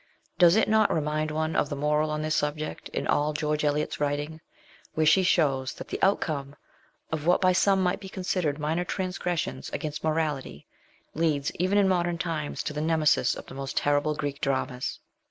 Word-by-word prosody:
Does 175 0 +7
it 220 - +3
not 215 -1 +4
remind 155 0 0
one 155 +1 -1
of 145 - +1
the 145 - -3
moral 150 +2 +1
on 150 0 -2
this 155 0 0
subject 150 +1 -2
in - - -3
all 150 +1 +1
George 150 0 -1
Eliot's 150 0 0
writing, 145 +2 -2 0.5
where 155 - +2
she 190 +5 +6
shows 135 -8 +2
that - - -9
the - - -4
outcome 145 -7 0 0.6
of 160 0 -3
what 175 - +5
by 185 -1 +4
some 190 +1 +3
might 180 +1 +1
be 195 -2 -9
considered 180 -6 -1
minor 160 +3 -1
transgressions 180 -2 -3
against 150 -1 -4
morality 155 - -2 0.5
leads 150 -3 0
even 185 +3 +2
in 200 -1 +4
modern 175 -2 +1
times 165 -4 -3
to 150 - -3
the 150 - -3
Nemesis 155 -1 +2
of - - -9
the - - -11
most 135 0 -5
terrible 145 +1 +2
Greek 145 -2 -4
Dramas 130 -2 -2
155 Hz, 185 wpm, -27 LUFS, 145-175 Hz, 0.6 s, Does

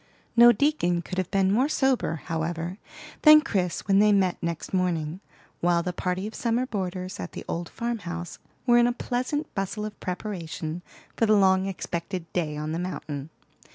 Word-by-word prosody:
No 240 0 +9
deacon 210 - +1
could 185 +2 -4
have 185 - -2
been 195 -1 +2
more 255 +8 +3
sober, 260 - +1
however, 165 +3 -3 0.4
than 305 0 +9
Chris 190 - -1
when 195 0 +5
they 210 0 +5
met 190 -3 +2
next 170 +1 -4
morning, 175 -3 0 0.4
while 170 0 +2
the 180 0 -2
party 180 +2 -2
of 220 - -6
summer 235 +1 0
boarders 185 -4 -4
at - - -6
the - - -7
old 170 0 -3
farm 235 -1 -3
house 175 -1 -6 0.3
were 240 -1 +6
in 240 - +5
a 245 - +1
pleasant 255 +5 -2
bustle 200 +2 -3
of 210 -1 -8
preparation 175 -3 -4 0.3
for 225 - +2
the 215 - +5
long 190 -1 +4
expected 180 -1 -4
day 155 -4 -1
on 150 +1 -3
the 165 - -2
mountain. 155 -5 -5
185 Hz, 180 wpm, -26 LUFS, 170-220 Hz, 0.4 s, No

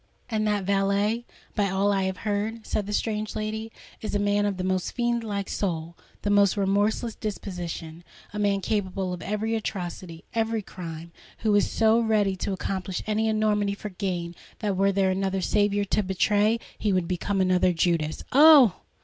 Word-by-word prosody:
"And 215 -1 +1
that 205 -2 +1
valet, 200 +4 +1 0.3
by 205 -2 +1
all 195 +2 +2
I 195 -1 +1
have 190 +2 -4
heard," 215 +2 -2
said 205 -2 -2
the - - -4
strange 215 0 -2
lady, 220 +1 -3 0.3
"is 215 - -3
a - - +4
man 205 0 +2
of 200 -2 -2
the 185 - -3
most 185 -1 -1
fiend 240 -1 0
like 200 -3 -3
soul—the 170 0 -4
most 200 -1 +4
remorseless 205 +4 +1
disposition,—a 175 -2 -7
man 200 -1 +1
capable 190 -3 -1
of 175 - -6
every 210 +5 -2
atrocity—every 205 +2 -3
crime,—and 170 -3 -8 0.3
who 215 -2 +2
is 205 - +3
so 225 0 +3
ready 215 -4 +2
to 190 - -2
accomplish 190 -1 -3
any 215 +1 0
enormity 210 -2 +1
for 210 - -6
gain, 180 -3 -3 0.2
that 205 -3 -1
were 195 +1 +3
there 190 -1 +2
another 190 0 -1
Saviour 205 +2 +1
to 205 - +1
betray, 205 +3 +2 0.2
he 210 - +1
would 185 -3 +1
become 190 +2 -1
another 185 -1 +3
Judas." 165 -2 0
"Oh! 280 - +8
200 Hz, 165 wpm, -26 LUFS, 185-215 Hz, 0.3 s, Oh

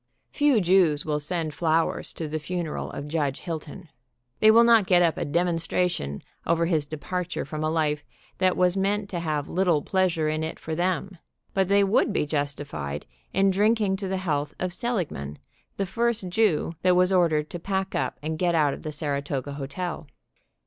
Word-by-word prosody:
Few 290 -5 +3
Jews 175 -5 +3
will 150 -1 0
send 160 0 -3
flowers 165 0 0
to 160 - -5
the 155 +1 -3
funeral 170 0 -4
of 145 - -6
Judge 145 -3 -1
Hilton. 165 +1 -6 0.5
They 215 - +6
will 230 +2 +7
not 230 -4 +5
get 175 -1 +5
up 165 -2 +2
a - - -2
demonstration 165 - 0 0.2
over 170 0 +2
his 160 -4 0
departure 180 +4 -4
from 155 +3 -4
a 155 - +1
life 150 -2 0 0.4
that 185 -1 +2
was 180 0 +3
meant 200 +1 0
to 175 - -2
have 155 -3 -2
little 175 -4 +1
pleasure 180 -5 +1
in 155 +1 -1
it 160 - -4
for 160 - -5
them, 180 +2 -1 0.3
but 190 -1 +2
they 200 +1 +4
would 195 +2 +2
be 195 - 0
justified 145 - -3 0.3
in 195 +1 +3
drinking 210 0 +2
to 195 -1 -4
the 190 0 -1
health 150 -5 -2
of 180 -1 -2
Seligman, 175 - -3 0.4
the 195 - 0
first 230 0 -1
Jew 180 -5 +1
that 180 -1 +4
was 180 +1 +3
ordered 160 -4 +2
to 175 - -5
pack 190 +2 -2
up 130 -2 -1
and 155 +1 -3
get 175 -2 +2
out 150 -3 +3
of - - -8
the 155 - -5
Saratoga 145 -2 -3
hotel. 150 +4 -5
170 Hz, 185 wpm, -26 LUFS, 150-190 Hz, 0.5 s, will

